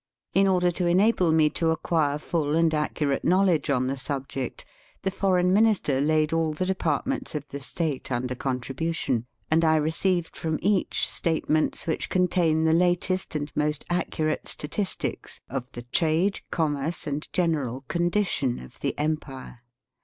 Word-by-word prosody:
In 195 Hz, +2 st, +4 dB
order 180 Hz, -2 st, +3 dB
to 175 Hz, 0 st, -1 dB
enable 185 Hz, -1 st, +3 dB
me 160 Hz, -1 st, +5 dB
to 165 Hz, -, +1 dB
acquire 160 Hz, -2 st, +1 dB
full 150 Hz, -1 st, -1 dB
and 165 Hz, 0 st, +3 dB
accu 150 Hz, -1 st, -1 dB
rate 140 Hz, -, 0 dB
knowledge 180 Hz, -5 st, +3 dB
on 130 Hz, -2 st, +2 dB
the 135 Hz, +1 st, -1 dB
subject, 135 Hz, -1 st, -4 dB, 0.4 s
the 190 Hz, -, 0 dB
Foreign 185 Hz, -1 st, +2 dB
Minister 200 Hz, -10 st, +3 dB
laid 155 Hz, +1 st, +2 dB
all 165 Hz, -1 st, +1 dB
the 170 Hz, +5 st, -2 dB
departments 190 Hz, -, -1 dB
of 145 Hz, -1 st, -5 dB
the 140 Hz, -, -6 dB
State 145 Hz, 0 st, -3 dB
under 125 Hz, +1 st, -1 dB
contribution, 130 Hz, 0 st, -2 dB, 0.2 s
and 165 Hz, +1 st, +4 dB
I 160 Hz, -1 st, +4 dB
received 165 Hz, +3 st, 0 dB
from 160 Hz, -1 st, -2 dB
each 200 Hz, -1 st, +1 dB
statements 155 Hz, -1 st, 0 dB
which 160 Hz, -, -2 dB
contain 175 Hz, -3 st, +2 dB
the 160 Hz, 0 st, +3 dB
latest 180 Hz, +1 st, +1 dB
and 145 Hz, -1 st, -2 dB
most 150 Hz, -1 st, 0 dB
accurate 155 Hz, -3 st, -1 dB
statistics 185 Hz, +6 st, -3 dB
of 130 Hz, 0 st, -5 dB
the 120 Hz, -, -7 dB
trade, 165 Hz, +9 st, +1 dB
commerce, 155 Hz, +1 st, -1 dB
and 145 Hz, 0 st, -4 dB
general 150 Hz, -8 st, 0 dB
condition 170 Hz, -7 st, 0 dB
of 65 Hz, -, -12 dB
the -, -, -2 dB
empire. 145 Hz, -5 st, -3 dB
160 Hz, 155 wpm, -26 LUFS, 145-175 Hz, 0.4 s, me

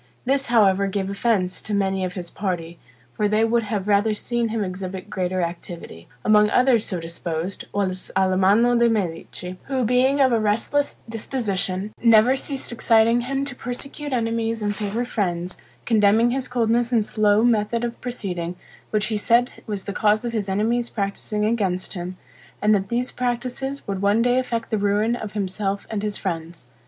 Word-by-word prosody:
This, 270 Hz, +1 st, +1 dB
however, 200 Hz, -4 st, +4 dB
gave 195 Hz, 0 st, -2 dB
offense 195 Hz, -3 st, 0 dB
to 210 Hz, -, -3 dB
many 195 Hz, -1 st, 0 dB
of 180 Hz, -1 st, -3 dB
his 175 Hz, -3 st, -6 dB
party; 175 Hz, -4 st, -4 dB, 0.3 s
for 210 Hz, -, +1 dB
they 215 Hz, +2 st, +3 dB
would 235 Hz, +1 st, +2 dB
have 210 Hz, -2 st, -3 dB
rather 210 Hz, +1 st, +3 dB
seen 235 Hz, +1 st, -1 dB
him 220 Hz, -1 st, -1 dB
exhibit 185 Hz, 0 st, -6 dB
greater 185 Hz, 0 st, -1 dB
activity. 170 Hz, -, -7 dB, 0.2 s
Among 210 Hz, 0 st, +5 dB
others 250 Hz, -2 st, +3 dB
so 180 Hz, -, -2 dB
disposed, 170 Hz, +2 st, -4 dB
was 185 Hz, -2 st, -2 dB
Alamanno 195 Hz, +6 st, +4 dB
de' 235 Hz, 0 st, +5 dB
Medici, 180 Hz, -2 st, -3 dB
who 265 Hz, -3 st, 0 dB
being 255 Hz, +4 st, +3 dB
of 265 Hz, -2 st, +5 dB
a 230 Hz, -, +3 dB
restless 225 Hz, +7 st, +1 dB
disposition, 210 Hz, -4 st, -2 dB
never 230 Hz, +2 st, +6 dB
ceased 270 Hz, -1 st, -4 dB
exciting 230 Hz, 0 st, +3 dB
him 270 Hz, +3 st, -2 dB
to 280 Hz, -, -5 dB
persecute 275 Hz, +4 st, -6 dB
enemies 230 Hz, -2 st, -1 dB
and 205 Hz, 0 st, 0 dB
favor 215 Hz, +4 st, -2 dB
friends; 180 Hz, -5 st, -2 dB, 0.3 s
condemning 220 Hz, +1 st, +4 dB
his 260 Hz, 0 st, -1 dB
coldness 235 Hz, 0 st, +1 dB
and 225 Hz, -3 st, +3 dB
slow 210 Hz, 0 st, +3 dB
method 230 Hz, 0 st, +2 dB
of 235 Hz, 0 st, -4 dB
proceeding, 180 Hz, -8 st, -4 dB, 0.3 s
which 215 Hz, -1 st, +1 dB
he 215 Hz, 0 st, -1 dB
said 235 Hz, +4 st, +3 dB, 0.2 s
was 205 Hz, -3 st, -4 dB
the 200 Hz, -, -5 dB
cause 215 Hz, +2 st, +2 dB
of 235 Hz, -, -3 dB
his 205 Hz, -3 st, -2 dB
enemies' 230 Hz, +5 st, 0 dB
practicing 210 Hz, 0 st, -2 dB
against 195 Hz, -5 st, -1 dB
him, 180 Hz, -1 st, -5 dB, 0.4 s
and 210 Hz, +1 st, +3 dB
that 195 Hz, -2 st, 0 dB
these 245 Hz, +2 st, 0 dB
practices 250 Hz, +3 st, -3 dB
would 195 Hz, -1 st, -3 dB
one 205 Hz, +3 st, +3 dB
day 245 Hz, +1 st, +3 dB
effect 230 Hz, -3 st, -3 dB
the 215 Hz, -, +1 dB
ruin 205 Hz, +3 st, +2 dB
of 215 Hz, -3 st, -6 dB
himself 200 Hz, 0 st, -2 dB
and 215 Hz, -2 st, -2 dB
his 210 Hz, -1 st, -2 dB
friends. 165 Hz, -4 st, -5 dB
215 Hz, 175 wpm, -23 LUFS, 195-235 Hz, 0.4 s, never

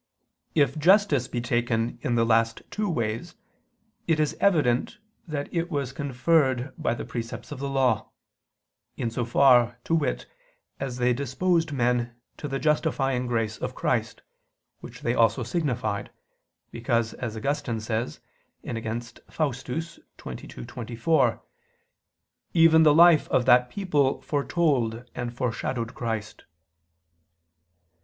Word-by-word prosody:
If 140 Hz, -1 st, +2 dB
justice 170 Hz, -, +4 dB
be 120 Hz, -2 st, -3 dB
taken 120 Hz, -1 st, -1 dB
in 120 Hz, -, 0 dB
the 115 Hz, 0 st, +3 dB
last 115 Hz, 0 st, +2 dB
two 210 Hz, -1 st, -1 dB
ways, 115 Hz, -8 st, -3 dB, 0.7 s
it 160 Hz, -2 st, +2 dB
is 155 Hz, -1 st, +1 dB
evident 150 Hz, -7 st, +2 dB, 0.3 s
that 145 Hz, -3 st, -3 dB
it 170 Hz, 0 st, -1 dB
was 140 Hz, -6 st, -2 dB
conferred 130 Hz, -1 st, +1 dB
by 155 Hz, -7 st, -1 dB
the -, -, -6 dB
precepts 115 Hz, +3 st, -6 dB
of 145 Hz, -, -6 dB
the 140 Hz, 0 st, -3 dB
Law; 135 Hz, -2 st, +1 dB, 0.9 s
in 115 Hz, -, -2 dB
so 120 Hz, +1 st, -2 dB
far, 120 Hz, -1 st, +4 dB
to -, -, -2 dB
wit, 60 Hz, -, 0 dB, 0.5 s
as 130 Hz, -2 st, -4 dB
they 125 Hz, 0 st, +2 dB
disposed 155 Hz, +6 st, 0 dB
men 120 Hz, -2 st, 0 dB, 0.2 s
to 150 Hz, -, -5 dB
the 135 Hz, -1 st, -2 dB
justifying 135 Hz, -4 st, 0 dB
grace 115 Hz, -2 st, -1 dB
of -, -, -4 dB
Christ, -, -, -1 dB, 0.6 s
which -, -, -11 dB
they 120 Hz, -, 0 dB
also 115 Hz, +1 st, +3 dB
signified, 120 Hz, -, -2 dB, 0.6 s
because 115 Hz, -1 st, -1 dB
as 115 Hz, -3 st, -5 dB
Augustine 120 Hz, -1 st, -2 dB
says 110 Hz, +2 st, -3 dB, 0.4 s
(Contra 115 Hz, 0 st, -3 dB, 0.3 s
Faust. 140 Hz, -5 st, -2 dB
xxii, 165 Hz, +5 st, -5 dB, 0.5 s
24), 120 Hz, -, -1 dB, 1.1 s
"even 165 Hz, -1 st, +6 dB
the 150 Hz, -2 st, +6 dB
life 170 Hz, -2 st, +6 dB
of 125 Hz, -, +2 dB
that 125 Hz, -1 st, +5 dB
people 150 Hz, -7 st, 0 dB
foretold 140 Hz, -6 st, 0 dB
and 120 Hz, -1 st, -4 dB
foreshadowed 120 Hz, 0 st, -3 dB
Christ." 110 Hz, -4 st, -5 dB
125 Hz, 125 wpm, -26 LUFS, 115-150 Hz, 1.1 s, even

